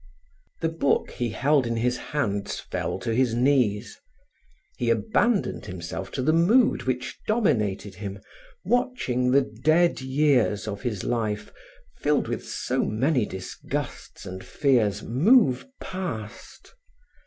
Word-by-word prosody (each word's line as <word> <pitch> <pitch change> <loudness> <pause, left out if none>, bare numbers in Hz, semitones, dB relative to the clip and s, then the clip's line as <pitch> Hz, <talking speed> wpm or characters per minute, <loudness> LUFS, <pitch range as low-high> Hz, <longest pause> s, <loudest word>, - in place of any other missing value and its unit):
The 165 - +1
book 160 -4 0
he 120 -1 -2
held 135 +2 +2
in 115 - -1
his 125 +2 +1
hands 105 -10 -2
fell - - -3
to 115 - -1
his 120 -1 +2
knees. 120 -5 +1 0.8
He 120 - 0
abandoned 220 - +1
himself 95 +1 -6
to 130 - -2
the 155 +4 +3
mood 215 +10 +4
which 125 -1 -2
dominated 105 - +1
him, 100 +1 -6 0.5
watching 245 - +1
the 135 +2 +5
dead 155 +8 +2
years 130 -6 +2
of 100 -1 -4
his 110 -7 -3
life 110 -3 -2 0.4
filled 150 0 +1
with - - -3
so - - -1
many 125 +2 +1
disgusts 95 0 -6
and 95 0 -7
fears, 115 -8 +1
move 145 - +4
past. 165 - -7
125 Hz, 125 wpm, -25 LUFS, 105-150 Hz, 0.8 s, the